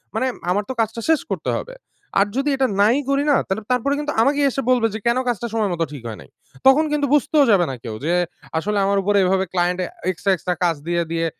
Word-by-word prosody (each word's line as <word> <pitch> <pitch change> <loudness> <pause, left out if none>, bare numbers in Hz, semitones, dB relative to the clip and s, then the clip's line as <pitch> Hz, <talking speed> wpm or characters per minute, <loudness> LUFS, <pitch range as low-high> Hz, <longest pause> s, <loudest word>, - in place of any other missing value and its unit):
মানে 255 +4 +1 0.2
আমার 205 +3 +1
তো - - -2
কাজটা 225 +1 -2
শেষ 320 -2 +4
করতে - - -2
হবে। - - -7 0.4
আর 200 - +5
যদি 275 +2 0
এটা 265 -1 +1
নাই 220 +5 +4
করি 275 +1 +2
না, 280 - +5
তালে 195 +3 -2
তারপরে 250 +3 +1
কিন্তু 295 0 -2
আমাকেই 285 +3 +2
এসে 270 - -2
বলবে, 240 -3 +3
যে 220 - -4
"কেন 235 +2 +3
কাজটা 240 -1 -1
সময়মত 200 -7 -1
ঠিক 135 -5 -9
হয় 110 -2 -7
নাই?" 65 - -16 0.4
তখন 275 +4 +6
কিন্তু 295 -1 +1
বুঝতেও 295 +1 +3
যাবে 185 -4 +4
না - - -5
কেউ, 115 -3 -5
যে 170 - +1 0.4
আসলে 205 +6 -1
আমার 200 0 +1
উপরে 205 +1 +2
এভাবে 190 +1 +1
ক্লায়েন্টে 180 0 0
আ - - -24 0.2
এক্সট্রা, 190 +2 -1
এক্সট্রা 180 +1 -3
কাজ 170 -1 +2
দিয়ে 170 0 +1
দিয়ে, 165 0 0
210 Hz, 230 wpm, -21 LUFS, 180-270 Hz, 0.4 s, তখন